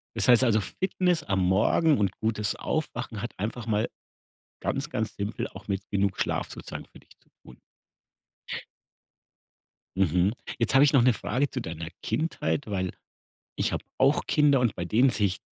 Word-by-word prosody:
Das - - +2
heißt 125 +1 +7
also, 110 -3 +3
Fitness 180 - 0
am 100 -1 0
Morgen 110 - +3
und 100 -3 +1
gutes 105 -2 0
Aufwachen 125 -8 -3
hat 120 - -5
einfach 115 +3 -3
mal 110 -1 0 0.7
ganz, 140 +3 -2
ganz 110 -8 -3
simpel 100 +2 -3
auch 95 +1 -12
mit 100 -1 -3
genug 100 -1 0
Schlaf - - -1
sozusagen - - -7
für - - -17
dich - - -22
zu - - -33
tun. 65 - -15 2.4
Mhm. 90 +2 +3 0.2
Jetzt 115 0 0
habe 135 +1 +7
ich 145 - +4
noch 135 - +6
'ne 125 - +5
Frage 135 +5 -1
zu - - -4
deiner 80 0 -6
Kindheit, 150 -2 -1
weil 95 -3 -1 0.7
ich - - 0
habe - - -3
auch 135 +3 +3
Kinder 145 -3 +4
und 120 -5 +1
bei 90 - -4
denen 120 +9 +4
sehe 110 -3 +2
ich 95 -1 -3
110 Hz, 170 wpm, -27 LUFS, 100-135 Hz, 2.4 s, heißt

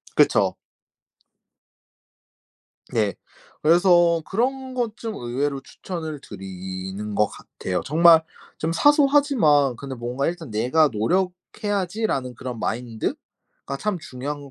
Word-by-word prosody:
그쵸. - - +4 2.4
예. 105 -3 +1 0.5
그래서 175 0 +5
그런 260 +4 -1
것 235 -3 -2
좀 225 -2 -5
의외로 135 +2 -2
추천을 160 -1 -7
드리는 95 +1 -6
거 105 +1 +3
같아요. 90 -2 -5
정말 165 +2 +6 0.4
좀 160 +1 -1
사소하지만 275 - +4
근데 135 +1 -6
뭔가 125 +3 -3
일단 165 -5 -4
'"내가 125 +9 +3
노력해야지."라는 180 - -1
그런 125 -1 -6
마인드가 115 -1 -2 0.6
참 210 -4 -1
중요한 145 +1 -6
것 140 - -12
150 Hz, 235 characters per minute, -23 LUFS, 120-190 Hz, 2.4 s, 정말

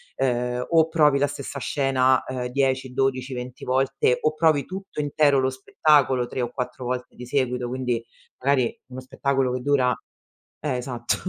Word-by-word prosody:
ehm, 125 -1 0
o 160 -1 +5
provi 150 -4 +4
la 145 - +3
stessa 140 0 -6
scena 130 -1 +2
ehm, 125 -1 -3
10-12-20 130 -1 -1
volte 130 -1 +1
o 155 - +2
provi 155 -3 +2
tutto 190 -4 -7
intero 145 -1 +3
lo 130 0 +2
spettacolo 130 -1 +2
3 130 - -4
o 120 -1 -2
4 125 0 -5
volte 125 0 -4
di 125 - -9
seguito, 125 -2 -1
quindi 125 -2 -2 0.4
magari 130 -3 +2
uno 130 0 -8
spettacolo 130 0 -1
che 125 - -3
dura 130 -2 +2 0.6
eh 140 -4 -2
esatto. 120 -1 -2
130 Hz, 155 wpm, -24 LUFS, 125-140 Hz, 0.6 s, o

